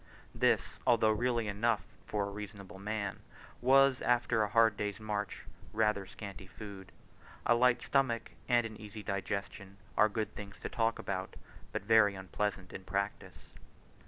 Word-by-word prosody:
This, -, -, +1 dB
although 110 Hz, -2 st, +5 dB
really 120 Hz, 0 st, +1 dB
enough 105 Hz, +4 st, +1 dB, 0.2 s
for 100 Hz, -1 st, -1 dB
reasonable 100 Hz, -2 st, -8 dB
men, 100 Hz, -1 st, -3 dB, 0.4 s
was, 135 Hz, +1 st, +5 dB
after 120 Hz, -2 st, +2 dB
a 105 Hz, -, +1 dB
hard 115 Hz, 0 st, +5 dB
day's 105 Hz, 0 st, -3 dB
march, 105 Hz, -1 st, -3 dB, 0.3 s
rather 105 Hz, -3 st, +1 dB
scanty 100 Hz, -1 st, -9 dB
food: 100 Hz, -2 st, -9 dB, 0.5 s
a 120 Hz, -, +5 dB
light 120 Hz, 0 st, +4 dB
stomach 125 Hz, -7 st, +1 dB, 0.2 s
and 120 Hz, -1 st, +4 dB
an 110 Hz, -1 st, -6 dB
easy 105 Hz, 0 st, -8 dB
digestion 100 Hz, -1 st, -4 dB, 0.2 s
are 105 Hz, -, +5 dB
good 110 Hz, 0 st, -2 dB
things 100 Hz, -1 st, -8 dB
to -, -, -4 dB
talk 115 Hz, 0 st, +1 dB
about, 95 Hz, -1 st, -4 dB, 0.4 s
but -, -, -3 dB
very 105 Hz, -2 st, +5 dB
unpleasant 95 Hz, 0 st, -3 dB
in 95 Hz, -, -7 dB
practice. 100 Hz, +2 st, -4 dB
105 Hz, 145 wpm, -33 LUFS, 100-115 Hz, 0.5 s, although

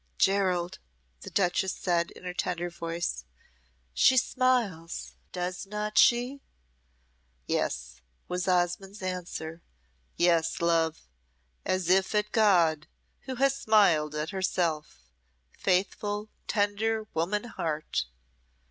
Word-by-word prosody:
"Gerald," 185 Hz, -3 st, +1 dB, 0.4 s
the -, -, -9 dB
duchess 190 Hz, 0 st, +1 dB
said, 170 Hz, -2 st, 0 dB
in -, -, -14 dB
her 180 Hz, -1 st, -4 dB
tender 175 Hz, -1 st, -2 dB
voice, 165 Hz, -, -3 dB, 0.7 s
"she 260 Hz, -, +5 dB
smiles, 235 Hz, -11 st, 0 dB, 0.2 s
does 180 Hz, +1 st, -4 dB
not 210 Hz, +1 st, -3 dB
she?" 245 Hz, +3 st, +4 dB, 1.0 s
"Yes," 65 Hz, -3 st, -2 dB, 0.3 s
was 180 Hz, +1 st, -2 dB
Osmonde's 185 Hz, +2 st, 0 dB
answer 175 Hz, -3 st, -5 dB, 0.6 s
"yes, 170 Hz, -2 st, +2 dB
love, 165 Hz, -, +1 dB, 0.6 s
as 185 Hz, -2 st, 0 dB
if 190 Hz, +3 st, +3 dB
at 210 Hz, 0 st, +1 dB
God, 170 Hz, -8 st, +3 dB, 0.4 s
who 260 Hz, -, -4 dB
has 275 Hz, +2 st, +3 dB
smiled 195 Hz, -, +3 dB
at 150 Hz, +1 st, -2 dB
herself 170 Hz, -, -1 dB, 0.5 s
faithful, 205 Hz, +3 st, 0 dB, 0.2 s
tender 215 Hz, +1 st, 0 dB
woman 180 Hz, +6 st, 0 dB
heart!" 160 Hz, -, -2 dB
180 Hz, 105 wpm, -28 LUFS, 170-210 Hz, 1.0 s, she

